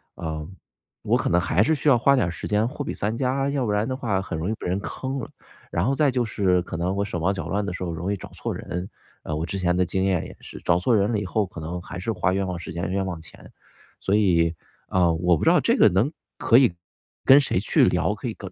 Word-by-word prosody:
呃， 80 -2 -5 0.6
我 - - +2
可 - - -1
能 90 - +3
还 85 +1 +1
是 160 +7 +2
需 150 - -3
要 135 - +7
花 140 +4 +4
点 110 -10 +2
儿 - - -2
时 - - -6
间， 105 +2 +2
货 145 +3 -5
比 - - -4
三 105 +3 -2
家， 135 +2 0
要 140 -2 -1
不 105 - 0
然 105 +2 +1
的 130 - -2
话， 105 -7 0
很 95 - -5
容 80 +5 -2
易 - - 0
被 - - -9
人 90 +2 0
坑 130 +6 -4
了。 125 - -6 0.4
然 85 +2 0
后 135 - +2
再 150 0 +3
就 125 -1 0
是 95 -4 +1
可 85 - -7
能， 90 +3 -1
我 100 0 0
手 90 -3 -4
忙 90 +4 +1
脚 95 - -5
乱 100 +2 -1
的 90 - -3
时 90 - -5
候， 85 - -3
容 85 +4 -3
易 100 - -1
找 - - -10
错 - - -4
人。 90 +2 -5 0.3
呃， 75 - -3
我 80 +2 -2
之 95 +2 -4
前 90 -1 +1
的 90 - +3
经 95 +2 -1
验 95 -4 +1
也 - - -10
是， - - -10
找 85 0 +3
错 115 +6 +2
人 100 +1 +2
了 110 - 0
以 105 - -4
后， 105 +3 0
可 90 -2 -10
能 85 +3 -4
还 90 - -8
是 110 +5 -2
花 95 - 0
冤 95 0 0
枉 90 -1 -3
时 - - -7
间、 85 +1 -3
冤 95 0 0
枉 90 -3 -5
钱。 80 - -14 0.5
所 100 - +1
以， 85 -5 +3 0.3
呃， 90 -3 +2
我 85 +1 +2
不 - - -4
知 - - +5
道 - - +5
这 - - +2
个 - - +7
能 100 - +1 0.3
可 115 - +4
以， 125 -9 +5 0.5
跟 135 - +9
谁 135 -10 0
去 100 - +3
聊， - - 0
可 - - -6
以 - - -7
95 Hz, 305 characters per minute, -24 LUFS, 90-110 Hz, 0.6 s, 跟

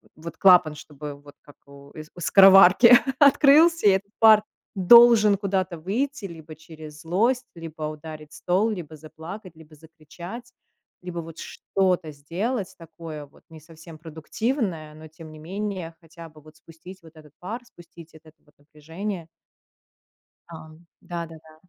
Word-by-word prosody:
вот 165 0 -11
клапан, 180 -5 +4
чтобы 150 0 -10
вот 145 0 -17
как 145 - -19
у 140 0 -17 0.2
у - - -13
скороварки 195 +5 +6 0.3
открылся, 295 +1 +4
и - - +7
этот 195 +1 -3
пар 220 -2 +6 0.3
должен 215 +1 +6
куда-то 190 -3 -3
выйти, 230 - -4
либо 160 -3 -11
через 155 -1 -14
злость, 230 +10 -1
либо 165 -2 -10
ударить 155 0 -9
стол, 190 +5 -1
либо 175 -7 -7
заплакать, 160 +4 -12
либо 160 -1 -18
закричать, 165 - -13 0.5
либо 180 -1 -7
вот 165 -1 -10
что-то 180 -4 -3
сделать 180 - -5
такое, 160 -2 -11
вот 140 - -25
не 160 -1 -14
совсем 160 +1 -15
продуктивное, 165 - -5
но, 155 +1 -14
тем 160 0 -14
не 155 - -14
менее, 185 0 -6
хотя 165 0 -14
бы 155 0 -19
вот 155 +1 -19
спустить 165 +4 -15
вот 160 -1 -19
этот 150 -2 -18
пар, 220 +7 -7
спустить 170 -6 -17
этот 160 -1 -19
вот 150 - -28
напряжение. 160 +5 -9 1.2
Да. 170 - -10 0.4
Да-да-да. 165 -2 -10
165 Hz, 140 wpm, -23 LUFS, 155-195 Hz, 1.2 s, и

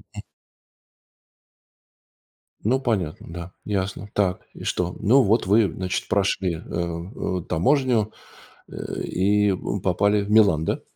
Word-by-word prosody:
Мгм. - - -5 2.4
Ну, 130 +5 +2
понятно, 100 - -2
да, 85 +1 -7
ясно. 100 0 -3
Так, 95 -3 +1
и - - -10
что? 90 0 -1
Ну, 120 +6 +5
вот, 110 +1 +2
вы, 105 -2 +4
значит, 95 0 -3
прошли, 95 -3 +1
э, - - -8
э, 85 +2 -4
таможню, 115 - +2 0.6
э, - - -6
и, 105 +2 +2
м, 95 +1 -3
попали 100 +3 +2
в 100 - -7
Милан, 100 -8 +5
да? - - -1
100 Hz, 125 wpm, -24 LUFS, 90-105 Hz, 2.4 s, Ну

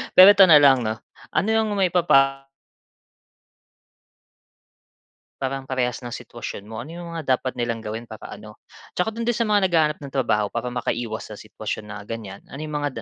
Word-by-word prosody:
Pero 185 - +11
ito 200 - +8
na 155 -3 +8
lang 135 -3 +5
'no, 110 +1 -3 0.3
ano - - 0
ang 220 -1 +1
maipapa 160 -8 +3 3.0
Parang 135 0 -3
parehas 125 -2 -1
ng 120 - -6
sitwasyon 120 -4 -7
mo, 110 -1 -6
ano 130 - -10
yung 170 0 -8
mga 140 -6 +1
dapat 130 - -5
nilang 120 -2 -2
gawin 110 +2 -6
para 110 -2 -10
ano, 105 0 -12 0.4
tsaka 180 +4 0
dun 230 +1 -4
din 240 - +2
sa 230 0 0
mga 205 -2 +3
naghahanap 155 -3 +2
ng 140 -2 -9
trabaho 110 -6 +1
para 120 +1 -2
makaiwas 115 -3 -4
sa - - -8
sitwasyon 110 0 -6
na 105 - -6
ganyan. 105 -3 -7
Ano 140 - -9
yung 150 -1 -5
mga 140 -6 -3
130 Hz, 175 wpm, -23 LUFS, 115-160 Hz, 3.0 s, Pero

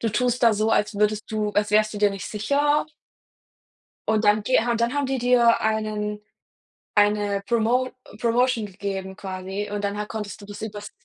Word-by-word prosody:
du 225 - 0
tust 245 +3 0
da 230 - +6
so, 215 +1 +1
als 210 0 +1
würdest 210 +1 +1
du 215 -1 -1
als 205 0 +1
wärst 215 0 +3
du 205 - -4
dir 205 -1 +4
nicht 195 -1 -6
sicher? 285 +8 +1 1.2
Und 220 0 +2
dann 210 0 +4
geha 240 +1 +2
und 230 - 0
dann 235 +3 +1
haben 285 -1 0
die 265 0 -1
dir 240 -1 +4
einen 215 -1 -1 0.8
eine 205 -1 +2
Promo 240 +2 +1 0.3
Promotion 240 -1 +2
gegeben 190 -1 -5
quasi 190 +2 -5
und 205 0 -3
danach 205 +1 -2
konntest 210 -1 -6
du 200 - -11
das 205 +1 -9
übers 210 -1 -6
215 Hz, 180 wpm, -24 LUFS, 205-235 Hz, 1.2 s, da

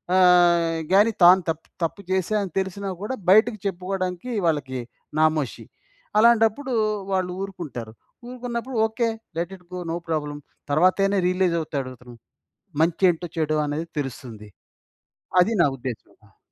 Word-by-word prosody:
ఆహ్, 175 -2 +5
కానీ 210 +4 +5
తాను 185 +2 +8
తప్పు 165 0 -4 0.2
తప్పు 165 +5 -2
చేశాని 190 +1 0
తెలిసినా 195 +1 -3
కూడా 210 +6 -3 0.2
బయటకి 215 +1 +5
చెప్పుకోడానికి 185 +2 -3
వాళ్ళకి 140 -5 -1 0.4
నామోషి. 155 -4 +1 0.5
అలాంటప్పుడు 235 +3 +3 0.4
వాళ్ళు 185 -1 0
ఊరుకుంటారు. 145 - -7 0.4
ఊరుకున్నప్పుడు 245 0 -5
okay. 230 +1 -1 0.3
Let 175 +3 -3
it 180 - -25
go. - - -4
No - - -1
problem. 150 -2 -2 0.3
తర్వాతైన 185 +6 +3
realise 180 -1 +1
అవుతాడతను. 130 -5 -6 0.7
మంచేంటో 175 +1 +2
చెడో 155 -1 0
అనేది 150 +3 -3
తెలుస్తుంది. 120 -5 -7 0.9
అది 205 +6 +3
నా - - +6
ఉద్దేశ్యం. 125 -3 -7
ఆ! - - -28
180 Hz, 120 wpm, -24 LUFS, 155-200 Hz, 0.9 s, తాను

